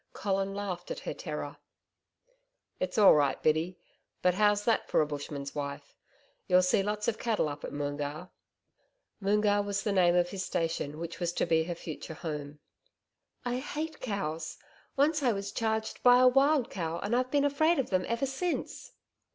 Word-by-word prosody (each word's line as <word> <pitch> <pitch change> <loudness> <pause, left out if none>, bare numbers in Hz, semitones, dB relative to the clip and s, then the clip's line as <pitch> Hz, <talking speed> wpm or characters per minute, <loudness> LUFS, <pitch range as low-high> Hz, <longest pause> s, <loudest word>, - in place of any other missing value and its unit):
Colin 195 0 -1
laughed 185 -3 -4
at - - -5
her - - -4
terror. - - -6 1.2
'It's 185 +3 -2
all 205 -3 +8
right, 145 -3 +2
Biddy. 160 +4 +1 0.5
But 180 - +4
how's 205 +1 +2
that 230 - +1
for - - +3
a 155 - +4
Bushman's 145 -1 -5
wife. 140 0 -6 0.5
You'll 180 0 +5
see 180 +2 +3
lots 210 +1 -2
of 230 - 0
cattle 225 -8 +1
up 145 0 -6
at - - -5
Moongarr.' 145 +4 -4 0.9
Moongarr 205 +1 +3
was 200 -1 -2
the 210 - 0
name 180 -3 +4
off 175 0 +2
his 190 0 -4
station 165 -4 -2
which 170 +2 -6
was 175 -1 0
to - - 0
be 160 -1 +2
her 175 0 -3
future 160 -1 -7
home. 150 -3 -5 0.9
'I 245 0 -1
hate 305 +3 -5
cows. 165 -9 -3 0.4
Once 300 +2 +3
I 250 -4 +3
was 200 0 -4
charged 220 -1 -2
by 245 0 +7
a 255 0 +6
wild 270 +1 +3
cow 165 -3 -3
and 210 +4 0
I've 255 +1 +1
been 285 +1 +2
afraid 315 +4 +3
of 270 - -1
them 185 -1 +2
ever 235 +3 0
since.' 300 +7 -3
195 Hz, 175 wpm, -30 LUFS, 160-235 Hz, 1.2 s, all